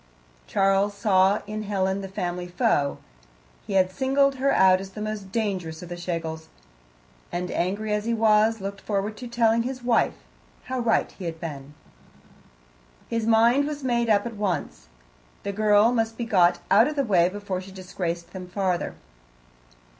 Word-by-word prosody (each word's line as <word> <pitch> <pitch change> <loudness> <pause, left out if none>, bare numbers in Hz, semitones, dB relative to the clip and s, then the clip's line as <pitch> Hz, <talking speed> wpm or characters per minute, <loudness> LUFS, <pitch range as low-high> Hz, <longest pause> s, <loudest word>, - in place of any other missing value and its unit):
Charles 195 - +2
saw 200 -1 +3
in 215 +1 -5
Helen 195 -2 -1
the 195 - -6
family 180 -2 -4
foe. 175 - +1 0.7
He - - -4
had 185 -1 +3
singled 275 +5 +2
her 275 +1 +2
out 185 0 +5
as 195 - -8
the 195 - -10
most 210 -2 -5
dangerous 185 -8 -3
of 175 - -9
the 175 - -5
Schlegels, 165 -2 -4 0.8
and, 180 +1 -3
angry 205 +4 -1
as 210 0 -1
he 235 - 0
was, 220 0 +3
looked 195 0 -6
forward 205 +1 -2
to 245 - -7
telling 230 -1 +2
his 255 +1 -5
wife 240 -1 +2 0.5
how 260 0 -3
right 235 -2 +1
he 185 - -9
had 165 -1 -5
been. 145 -3 -7 1.3
His 230 -1 -1
mind 235 +5 +4
was 295 -2 -5
made 235 -2 +1
up 205 0 +3
at 230 -2 -6
once: 185 - -3 0.6
the 200 - -3
girl 210 +2 +4
must 225 -2 -1
be 235 - -3
got 180 -5 +4
out 220 +6 +6
of 300 - -3
the 280 - +1
way 180 -5 +3
before 195 -1 -4
she 190 +1 -11
disgraced 180 -2 -5
them 185 -1 -8
farther. 185 -1 -2
200 Hz, 170 wpm, -25 LUFS, 185-225 Hz, 1.3 s, out